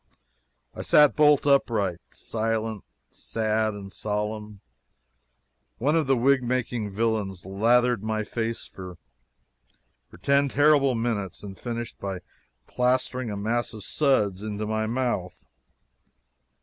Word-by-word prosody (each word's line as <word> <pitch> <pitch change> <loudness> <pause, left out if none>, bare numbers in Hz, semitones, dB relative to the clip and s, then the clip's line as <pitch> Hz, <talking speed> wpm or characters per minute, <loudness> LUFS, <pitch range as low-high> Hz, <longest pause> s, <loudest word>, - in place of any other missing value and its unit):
I - - -6
sat 150 -1 +5
bolt 150 -2 +5
upright, 110 - +2
silent, 110 -1 -3 0.3
sad, 110 -1 -1
and 100 -1 -9
solemn. 105 -1 -4 1.2
One 145 +6 +1
of 160 -4 +1
the 135 -1 +3
wig 135 +2 +3
making 120 -3 -2
villains 100 -3 -2
lathered 115 +4 +2
my 110 0 -1
face 115 +1 -3
for 90 -2 -10 1.3
ten 140 0 +3
terrible 145 -2 +4
minutes 115 -5 -3
and 100 -2 -8
finished 120 +2 -6
by 95 -2 -4 0.4
plastering 125 0 0
a 105 - -4
mass 115 +3 -1
of 105 - -9
suds 105 -9 +1
into 105 0 -4
my 110 0 -1
mouth. 120 -6 -2
110 Hz, 115 wpm, -26 LUFS, 105-125 Hz, 1.3 s, sat